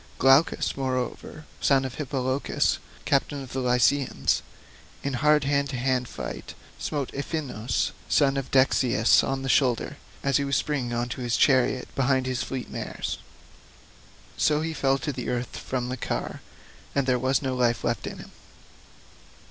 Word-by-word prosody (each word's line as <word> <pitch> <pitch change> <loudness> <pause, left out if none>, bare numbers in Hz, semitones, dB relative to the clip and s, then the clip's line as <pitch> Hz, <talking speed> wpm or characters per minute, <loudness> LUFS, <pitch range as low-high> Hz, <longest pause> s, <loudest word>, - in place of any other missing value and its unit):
Glaucus, 135 +4 +4
moreover, 130 +3 -3
son 135 -1 +3
of 130 - -4
Hippolochus, 135 -1 0 0.3
captain 140 0 +1
of 130 - -10
the 135 - -1
Lycians, 125 +2 +2 0.6
in 140 - -2
hard 150 +3 +3
hand 140 0 +1
to 135 - -4
hand 125 0 0
fight - - -7 0.2
smote 145 -4 -2
Iphinous 135 -6 -2 0.2
son 140 -1 +3
of 135 -1 -3
Dexius 130 -1 +4
on 135 0 -2
the - - -3
shoulder, 125 -3 +2 0.3
as 140 -1 +3
he 140 - 0
was 140 0 0
springing 135 -5 -1
on 120 0 -1
to 125 - -5
his 120 -1 0
chariot 130 -1 +3
behind 130 -1 +2
his 130 -1 -1
fleet 130 -2 -4
mares; - - -4 1.2
so 150 0 +3
he 160 0 -2
fell 135 -3 +2
to 145 -1 -4
earth 125 -1 -3
from 125 -1 -3
the 130 - -3
car, - - -3 0.5
and 140 - +2
there 130 -1 +2
was 130 +3 +1
no 130 -1 -1
life 120 -3 +1
left - - -1
in - - -6
him. - - -11
135 Hz, 155 wpm, -26 LUFS, 125-140 Hz, 1.2 s, Glaucus